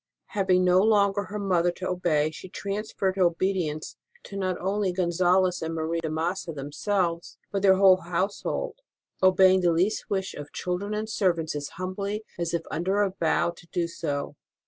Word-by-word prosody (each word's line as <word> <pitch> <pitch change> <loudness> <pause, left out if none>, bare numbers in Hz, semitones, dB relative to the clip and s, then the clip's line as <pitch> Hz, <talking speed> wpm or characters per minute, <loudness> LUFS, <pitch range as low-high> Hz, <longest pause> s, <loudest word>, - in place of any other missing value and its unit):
Having 190 -3 +2
no 180 0 +5
longer 205 -1 +3
her 205 +3 -6
mother 180 -4 +2
to 185 +1 -5
obey, 160 -4 +1
she 185 +4 -10
transferred 195 -1 -3
her - - +1
obedience 170 -3 -1 0.3
to 200 - -10
not 185 -2 -1
only 195 +1 0
Gonzalez 180 +1 +2
and 165 0 -3
Marie 160 +1 -1
de 165 -1 -3
Massa 165 +3 -2
them 145 -1 -7
selves, 170 0 -1
but 200 - 0
to 195 - +2
their 190 - +7
whole 190 -1 +6
household, 185 - -2 0.4
obeying 185 0 +5
the 175 -1 +3
least 185 +6 0
wish 190 -2 -1
of 145 0 -8
children 190 +4 -3
and 215 +1 -2
servants 175 -7 0
as 145 -1 -4
humbly 200 +4 -3 0.2
as 170 -1 -1
if 170 -1 -1
under 190 +6 +1
a 195 - 0
vow 170 +1 +2
to 170 0 -17
do 170 0 -1
so. 145 -4 -4
185 Hz, 180 wpm, -26 LUFS, 170-195 Hz, 0.4 s, their